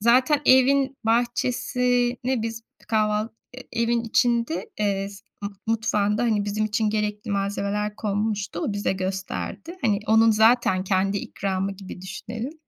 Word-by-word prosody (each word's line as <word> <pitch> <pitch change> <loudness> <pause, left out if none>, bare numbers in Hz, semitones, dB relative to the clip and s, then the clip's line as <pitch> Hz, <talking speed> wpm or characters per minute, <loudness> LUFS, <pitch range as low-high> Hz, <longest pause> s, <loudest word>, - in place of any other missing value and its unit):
zaten 255 +6 +4
evin 270 +1 +5
bahçesini 245 +1 +1
biz 225 0 -4 0.3
kahval 215 0 +1 0.3
e 255 -2 -6
evin 235 0 +2
içinde, 235 +5 +1
eee, 200 -2 0
s 200 -1 -12 0.2
mu 200 - -3 0.2
mutfağında, 215 -1 +1
hani 215 -4 +1
bizim 210 +1 -1
için 215 0 0
gerekli 210 +1 -2
malzemeler 200 +1 -1
konmuştu, 205 -2 -2
o 205 - -1
bize 205 -1 0
gösterdi. 190 - -4
Hani 210 -4 +2
onun 225 +1 +5
zaten 220 -3 +4
kendi 195 +1 +1
ikramı 195 0 -2
gibi 195 -1 -10
düşünelim. 225 +7 -6
215 Hz, 135 wpm, -24 LUFS, 200-235 Hz, 0.3 s, evin